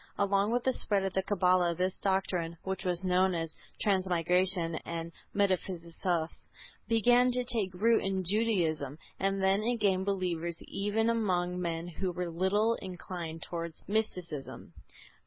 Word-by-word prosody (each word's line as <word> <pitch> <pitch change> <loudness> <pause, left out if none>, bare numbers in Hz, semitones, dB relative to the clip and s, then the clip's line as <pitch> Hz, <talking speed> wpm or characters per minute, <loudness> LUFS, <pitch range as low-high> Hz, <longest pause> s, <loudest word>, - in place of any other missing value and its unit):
Along 200 +1 +2
with 240 +1 +1
the 260 - +2
spread 200 -5 0
of 190 -1 -2
the 190 - +2
Cabala 180 -3 +2
this 185 +1 0
doctrine 180 -4 0
(which 190 0 -3
was 180 0 0
known 185 0 +3
as 165 -1 -3 0.3
Transmigration 180 -2 +2
and 170 0 -5 0.2
Metempsychosis) 175 -3 -1 0.4
"began 245 +2 +4
to 250 0 +2
take 225 -6 -1
root 225 +5 +3
in 190 -1 -1
Judaism 170 - +1 0.2
and 195 0 0
then 195 +2 +3
it 240 +2 0
gained 190 -2 +2
believers 170 -4 -1
even 210 +3 0
among 180 -6 +1
men 165 -1 -2
who 180 +2 -3
were 175 -1 -3
little 200 +6 +2
inclined 175 -3 -6
towards 170 -1 -5
Mysticism. 180 -9 -3
185 Hz, 140 wpm, -31 LUFS, 170-200 Hz, 0.4 s, began